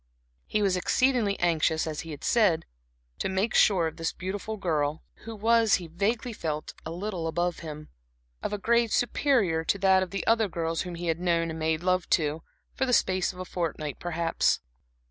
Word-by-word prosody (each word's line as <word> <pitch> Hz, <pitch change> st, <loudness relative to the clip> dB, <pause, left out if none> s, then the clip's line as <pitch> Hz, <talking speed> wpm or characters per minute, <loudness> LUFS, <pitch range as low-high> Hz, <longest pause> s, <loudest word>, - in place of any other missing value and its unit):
He 210 Hz, -1 st, 0 dB
was 195 Hz, -2 st, +2 dB
exceedingly 230 Hz, +1 st, +1 dB
anxious, 160 Hz, -2 st, +2 dB
as 155 Hz, -2 st, -4 dB
he 165 Hz, -, -6 dB
had 150 Hz, -3 st, -8 dB
said, 205 Hz, -9 st, +3 dB, 0.5 s
to -, -, -1 dB
make 190 Hz, +4 st, 0 dB
sure 185 Hz, -5 st, +4 dB
of 160 Hz, 0 st, -4 dB
this 165 Hz, 0 st, -2 dB
beautiful 200 Hz, +4 st, -5 dB
girl, 155 Hz, -5 st, -1 dB, 0.2 s
who 225 Hz, 0 st, -6 dB
was, 225 Hz, 0 st, +4 dB
he 180 Hz, -, -4 dB
vaguely 215 Hz, +8 st, -1 dB
felt, 155 Hz, -6 st, -4 dB
a -, -, -6 dB
little 175 Hz, 0 st, -3 dB
above 175 Hz, +1 st, -1 dB
him 155 Hz, -2 st, -8 dB, 0.5 s
of -, -, -3 dB
a 210 Hz, -, -1 dB
grade 235 Hz, +2 st, +2 dB
superior 230 Hz, -, +2 dB
to 200 Hz, -, +1 dB
that 190 Hz, -1 st, +4 dB
of 185 Hz, -, -2 dB
the 195 Hz, -1 st, -4 dB
other 225 Hz, -1 st, +3 dB
girls 165 Hz, -2 st, -2 dB
whom 180 Hz, -2 st, -5 dB
he 175 Hz, +1 st, -5 dB
had 165 Hz, 0 st, 0 dB
known 170 Hz, -2 st, +1 dB
and 160 Hz, -, -6 dB
made 160 Hz, +1 st, 0 dB
love 185 Hz, 0 st, +1 dB
to, 155 Hz, 0 st, -2 dB, 0.3 s
for 265 Hz, -, -1 dB
the 250 Hz, -, +1 dB
space 185 Hz, -5 st, +2 dB
of 180 Hz, -, -15 dB
a 185 Hz, -, -5 dB
fortnight 155 Hz, -5 st, -3 dB
perhaps. 170 Hz, -1 st, +1 dB
180 Hz, 195 wpm, -27 LUFS, 165-210 Hz, 0.5 s, sure